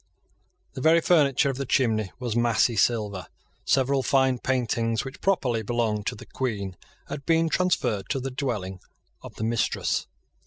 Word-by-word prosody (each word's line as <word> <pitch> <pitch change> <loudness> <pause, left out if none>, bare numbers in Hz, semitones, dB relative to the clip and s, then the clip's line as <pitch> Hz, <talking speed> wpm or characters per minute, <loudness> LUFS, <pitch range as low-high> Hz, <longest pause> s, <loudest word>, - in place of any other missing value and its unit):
The 130 - -6
very 160 +4 +5
furniture 140 -5 +3
of 130 - -7
the 140 - -3
chimney 110 -7 +1
was 120 -3 -3
massy 120 0 +2
silver. 105 -4 0 0.4
Several 135 0 +2
fine 130 -1 +2
paintings, 115 -3 0
which 135 - -9
properly 135 -12 +1
belonged 110 -2 -1
to - - -1
the - - -11
Queen, 100 -8 -3 0.3
had 140 - -6
been 165 +1 +2
transferred 125 - 0
to 135 - 0
the 135 +1 -4
dwelling 105 -9 -3 0.4
of - - -11
the - - -5
mistress. 115 0 0
125 Hz, 155 wpm, -26 LUFS, 110-135 Hz, 0.4 s, very